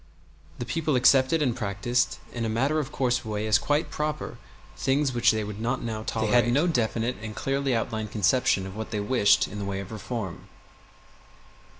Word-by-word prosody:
The 120 - -4
people 150 +4 -1
accepted 130 +4 +4
and 125 -5 0
practiced 120 +2 0 0.2
in 115 - -3
a 115 - -1
matter 135 +8 +1
of 150 -1 -4
course 125 -1 0
way 105 -1 -3
as 110 0 +4
quite 145 +2 0
proper 150 0 -3 0.4
things 135 0 +1
which 120 -1 +3
they 110 -1 +1
would 105 0 -6
not 120 +1 -1
now 110 -2 -3
tolerate. 110 -1 -1
They - - +4
had 120 - +1
no 145 +7 +3
definite 120 -5 0
and 110 -1 -6
clearly 135 -1 0
outlined 110 -1 -2
conception 105 0 +2
of 95 0 -8
what 110 0 -5
they 105 - -2
wished 105 -2 +3
in 105 - -7
the 100 - -3
way 100 -1 -3
of 100 +1 -7
reform. 110 -3 -5
120 Hz, 195 wpm, -26 LUFS, 110-130 Hz, 0.4 s, accepted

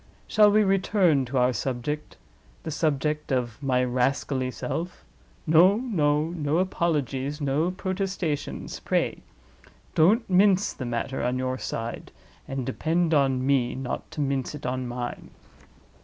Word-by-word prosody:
Shall 210 -1 +5
we 215 +1 +4
return 190 -7 +2
to 130 +2 -3
our 125 0 +3
subject—the 120 - -6
subject 150 0 -1
of 125 -2 -1
my 130 -2 +1
rascally 130 +1 0
self? 170 +7 -5 0.4
No! 170 +5 +6
no! 155 - +1
No 155 -2 -1
apologies, 150 -6 -1
no 145 +4 +1
protestations, 185 -4 -3
pray. - - 0 0.7
Don't 210 +9 +4
mince 190 +1 +3
the 130 - -6
matter 120 +3 -2
on 125 +1 0
your 130 0 -2
side—and 120 +3 -6
depend 165 +5 0
on 135 -3 +2
me 135 -3 +2
not 130 -1 -5
to 150 - -5
mince 135 0 -1
it 145 - -9
on 130 0 -2
mine. 120 0 -5
145 Hz, 125 wpm, -26 LUFS, 130-175 Hz, 0.7 s, No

